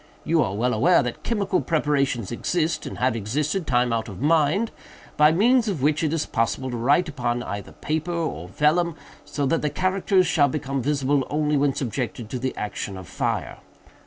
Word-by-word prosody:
You 160 0 +2
are 100 -7 -1
well 125 +4 +1
aware 145 +8 +4
that 125 -1 -5
chemical 200 -5 0
preparations 140 - 0
exist, 165 +7 -1
and - - -7
have 125 -1 +1
existed 150 - -2
time 120 -2 +2
out 115 -1 -2
of 95 - -9
mind, 160 - +2 0.4
by 150 +1 +6
means 235 +7 +3
of 175 -10 -2
which 150 +2 +2
it 155 - +1
is 160 -2 0
possible 115 +3 -1
to 120 - -3
write 145 +9 +3
upon 120 -4 -2
either 100 -3 -6
paper 160 +3 -3
or 160 - -3
vellum, 155 - +1 0.3
so 145 -1 -2
that 165 +5 +1
the 150 - 0
characters 185 +2 +1
shall 160 -4 +3
become 135 -1 -2
visible 140 0 +1
only 150 0 +1
when 140 -1 +2
subjected 120 -3 -4
to 125 - -3
the 130 +1 -3
action 100 -2 -4
of 95 -2 -9
fire. - - -2
145 Hz, 190 wpm, -24 LUFS, 120-165 Hz, 0.4 s, by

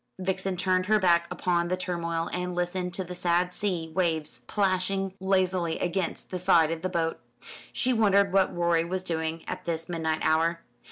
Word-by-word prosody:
Vixen 185 0 -2
turned 185 0 +1
her 215 0 +5
back 170 -3 +3
upon 175 -1 0
the 185 +1 -1
turmoil, 170 -2 -2
and 180 0 -2
listened 180 +1 -1
to 190 - -2
the 180 0 -7
sad 180 0 +1
sea 175 -6 -2
waves 165 -4 0
plashing 195 -1 0
lazily 185 -3 +1
against 180 0 -2
the 185 - -2
side 165 -3 +4
of 165 -1 -3
the 185 - -1
boat. 165 -2 -1 0.5
She 255 - +1
wondered 200 -3 +3
what 195 -1 +4
Rorie 170 -1 +2
was 185 +2 -3
doing 160 -2 -2
at - - -5
this 165 -1 -2
midnight 160 -2 -1
hour? 165 +1 +2
180 Hz, 175 wpm, -27 LUFS, 170-185 Hz, 0.5 s, her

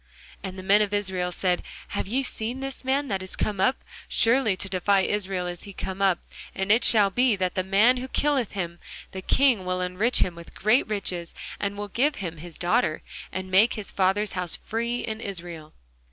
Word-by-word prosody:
And 190 0 -6
the 185 - -7
men 200 +2 +5
of 205 -1 0
Israel 185 -3 -1
said, 180 0 0 0.3
Have - - -3
ye 255 +6 0
seen 240 0 -3
this 270 0 -5
man 275 +2 0
that 195 -2 -1
is 185 - -5
come 205 -3 -1
up? 255 +7 +1 0.2
surely 230 -3 +4
to 190 - -1
defy 190 +1 +2
Israel 190 -2 -1
is 175 -1 -5
he 200 - -9
come 190 +1 -5
up: 190 -3 +4 0.4
and 190 +1 0
it 225 +3 +5
shall 205 -3 +5
be, 245 0 +3
that 185 -2 -1
the 185 - 0
man 210 +7 +4
who 255 +1 -5
killeth 275 -4 0
him, 175 -3 -4 0.3
the 190 - -6
king 245 -1 +3
will 185 0 -2
enrich 180 +7 +1
him 180 - -3
with 170 0 -13
great 215 +7 +3
riches, 185 -5 -3 0.2
and 200 0 -2
will 205 0 -4
give 275 +9 +1
him 170 -4 -5
his 165 +1 -9
daughter, 175 -2 +1 0.3
and 185 0 -5
make 205 +5 +5
his 210 -2 -3
father's 195 +2 +1
house 180 -2 -1
free 235 +2 -3
in 220 0 -4
Israel. 170 -6 -7
195 Hz, 205 wpm, -25 LUFS, 185-225 Hz, 0.4 s, men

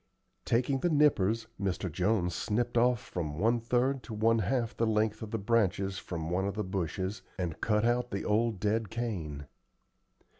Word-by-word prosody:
Taking 130 +3 +1
the 175 - +1
nippers, 115 - +3 0.2
Mr. 95 -2 -1
Jones 90 +1 +1
snipped 120 +7 -1
off 120 0 +4
from 75 -7 -5
one 115 +6 +2
third 125 +3 +1
to 110 - -6
one 115 +2 +3
half 115 +3 0
the 115 - +1
length 110 0 +1
of 110 - -5
the 115 - -2
branches 100 -3 +1
from 80 -2 -5
one 95 +2 +1
of 100 - -3
the 105 - -1
bushes 95 +1 -3 0.2
and 90 -4 -3
cut 105 0 +2
out 120 +1 +1
the 100 - -3
old 110 -1 +1
dead 105 +1 0
cane. 85 -11 -4
110 Hz, 175 wpm, -30 LUFS, 95-115 Hz, 0.2 s, off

